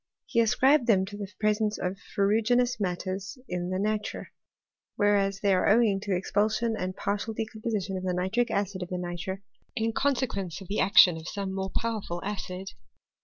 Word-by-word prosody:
He - - 0
ascribed 255 +4 +4
them 190 -5 +4
to 205 +1 -8
the 205 -1 -6
presence 215 0 +1
of 180 +1 -2 0.2
ferruginous 225 +5 +2
matters 190 +2 -3
in 180 0 -3
the 185 - -1
nitre; 210 +1 -2 0.7
whereas 200 -1 +2
they 200 -2 +3
are 185 - +3
owing 210 -2 +4
to 205 - -8
the 185 - +2
expulsion 215 +4 0
and 185 -2 -3
partial 205 +3 -2
decompo 220 +1 -4
ution 195 -3 -2
of 185 - -5
the 185 -1 0
nitric 195 +7 0
acid 200 -3 -1
of 180 - -5
the 180 - -3
nitre, 180 +2 -5 0.3
in 225 0 0
consequence 230 - -1
of 190 - -12
the 205 - -1
action 185 -4 +7
of 160 +1 -9
some 195 -2 -4
more 190 0 -3
powerful 215 -6 -3
acid. 190 -2 -5
200 Hz, 180 wpm, -28 LUFS, 185-220 Hz, 0.7 s, action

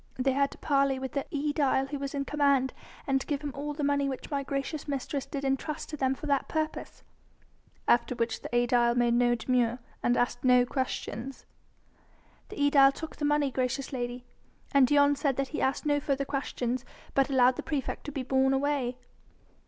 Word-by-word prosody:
"They 265 +1 +2
had 275 +1 +2
to - - -13
parley 275 -2 +2
with 265 0 -5
the 280 - -3
aedile 290 -2 +1
who 285 0 -4
was 275 0 -4
in 275 0 -1
command, 280 -3 +2 0.3
and 270 -1 +1
to - - -8
give 290 -1 -1
him 290 -1 -4
all 290 +2 -4
the 295 - -3
money 285 -1 +1
which 265 +3 -6
my 280 -1 0
gracious 275 +2 -4
mistress 280 0 -3
did 280 -1 -4
entrust 270 +3 -2
to 305 - -4
them 265 -2 0
for 305 - -9
that 280 -2 +1
purpose." 310 -1 -4 0.8
"After 245 +1 +3
which 230 -1 -2
the - - -7
aedile 240 0 +3
made 240 -1 +3
no 240 0 +3
demur... 240 0 +1 0.2
and 240 - +2
asked 245 0 0
no 250 -1 +5
questions?" 260 -1 -4 1.0
"The 420 - -8
aedile 280 -1 +6
took 320 +3 -8
the 295 - -2
money, 295 -2 +2
gracious 260 +2 -2
lady, 245 -1 -4 0.5
and 275 -2 +5
Dion 285 +1 +4
said 280 -2 0
that 275 0 -2
he 305 - -3
asked 265 +3 0
no 290 -1 +2
further 275 -1 -1
questions, 255 -3 -2 0.3
but 275 0 +2
allowed 255 -2 +4
the - - -4
praefect 290 -4 -3
to 295 - -5
be 275 -2 -3
borne 265 +1 +2
away." 270 -3 0
275 Hz, 195 wpm, -29 LUFS, 255-285 Hz, 1.0 s, aedile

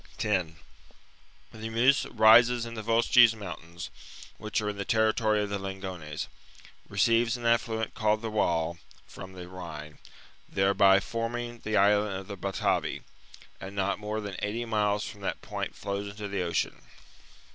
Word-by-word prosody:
10 95 -7 0 1.0
The 110 0 -6
Meuse 125 +5 +3
rises 120 +2 +6
in 115 - -7
the 110 - -5
Vosges 115 +1 +5
moun - - -14
The 105 - -7
Meuse 85 - -3 0.3
tams, - - -5 0.5
which 110 0 -1
are 105 -1 -2
m 105 - -5
the 100 - -2
territory 110 0 +2
of 100 - -5
the 100 - -1
Lingones, 95 -2 -6 0.2
Rhine. - - -23 0.6
receives 115 +4 +2
an 120 - -8
affluent 115 -1 +1
called 110 +1 +1
the 110 - -3
Waal 85 -5 0 0.3
from 95 0 -10
the 90 -1 -9
Rhine, 75 -5 -9 0.5
thereby 95 0 +4
forming 120 +3 -4
the 110 -1 -1
island 105 0 +3
of 95 0 -6
the 100 - -6
Batavi, 95 +1 -1 0.6
and 95 +1 -8
not 100 +1 0
more 105 +1 -3
than 100 -3 -6
eighty 110 +4 -2
miles 105 -2 +1
from 100 - -10
that 100 - -4
point - - -4
flows 100 0 -4
into 105 +1 -6
the 100 -1 -2
Ocean. 85 -1 -1
105 Hz, 170 wpm, -28 LUFS, 95-115 Hz, 1.0 s, rises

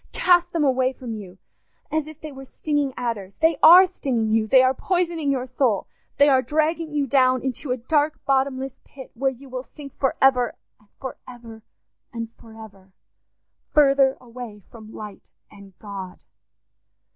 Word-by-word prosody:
Cast 350 -1 +3
them 330 -3 0
away 260 -1 +2
from 245 -2 -7
you, 190 -4 -9 0.5
as 310 0 -1
if 310 -1 -11
they 310 - -7
were 270 -1 -10
stinging 290 0 -2
adders. 210 -6 -4
They 320 -1 +2
are 355 +4 +9
stinging 250 -11 -2
you—they 225 +4 +4
are 260 0 +3
poisoning 340 -2 -1
your 255 -2 -1
soul—they 255 +2 0
are 265 -2 +4
dragging 310 +4 -1
you 295 -2 0
down 255 -2 +2
into 265 +1 -4
a 250 - 0
dark 295 +5 0
bottomless 270 -1 -1
pit, 265 -2 -13
where 270 +3 0
you 265 +1 -11
will 255 -1 -5
sink 280 +1 -12
for 270 - +1
ever, 250 -3 +3 0.2
and 210 -1 -29
for 260 -2 -6
ever, 230 -3 -11 0.5
and 230 -1 -5
for 225 -1 -16
ever, 195 -2 -19 0.8
further 275 -2 +4
away 235 -4 -10
from 220 -2 -12
light 210 -3 -10 0.2
and 200 -3 -16
God." 195 -3 -9
260 Hz, 160 wpm, -23 LUFS, 230-290 Hz, 0.8 s, are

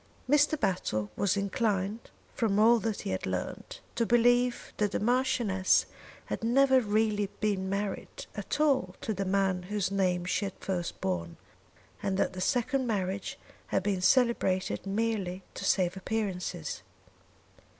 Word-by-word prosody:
Mr. 295 +2 +3
Battle 110 - -1
was 200 0 +1
inclined, 200 +1 -1 0.2
from 215 -4 +1
all 230 +2 +6
that 220 -2 -2
he - - -4
had 95 - -2
learned, 90 -1 -4 0.2
to 235 - +1
believe 245 +1 +2
that 210 -1 0
the - - 0
Marchioness 240 -5 +2 0.4
had - - -4
never 265 +2 +4
really 210 -2 +1
been 200 -3 0
married 205 - -4
at - - -4
all 265 -12 +2
to 220 - -2
the 195 0 -2
man 190 -1 +1
whose 195 +1 -2
name 180 -3 +1
she 185 +3 0
had 195 - -5
first 180 -3 -3
borne, 85 -3 -2 0.6
and 195 -1 -1
that 190 - +1
the 185 - -5
second 255 +5 +1
marriage 195 -3 -2 0.3
had 195 - 0
been 195 -2 0
celebrated 195 -5 +2
merely 195 -3 -1
to - - -7
save 185 -1 +2
appearances. 190 - -3
200 Hz, 145 wpm, -29 LUFS, 185-230 Hz, 0.6 s, all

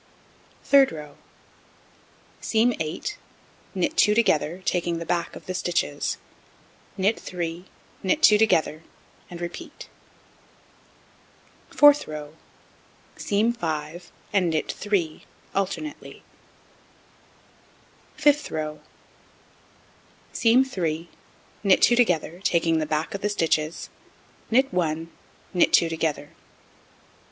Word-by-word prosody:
Third 275 -1 +5
row: 150 -2 -9 1.3
Seam 235 +2 +2
8, 165 - -4 0.6
knit 180 -2 0
2 210 0 +4
together, 180 -5 +1
taking 175 -1 0
the 170 - -5
back 170 +1 -2
of - - -11
the 185 - -4
stitches, 175 -5 -1 0.8
knit 200 +4 +1
3, 175 0 -5 0.4
knit 245 +12 0
2 210 -1 +7
together, 160 -8 +2 0.5
and 175 - -8
repeat. 175 0 -8 1.8
Fourth 290 0 +6
row: 150 0 -7 0.8
Seam 215 +4 +1
5, 165 -3 -5 0.2
and 185 -4 +3
knit 160 -1 -1
3, 190 -7 -2 0.3
alternately. 195 +10 -4 1.9
Fifth 295 -1 +2
row: 155 -1 -4 1.5
Seam 240 +3 +4
3, 170 -8 -3 0.5
knit 195 -2 +5
2 240 - +5
together, 180 -7 +1
taking 165 -4 +2
the 155 - -2
back 155 +1 -2
of 200 - -5
the 210 - 0
stitches, 160 -5 -1 0.6
knit 260 0 +2
1, 165 -2 -1 0.4
knit 180 - +3
2 165 - +4
together. 155 -3 -2
175 Hz, 100 wpm, -25 LUFS, 160-210 Hz, 1.9 s, 2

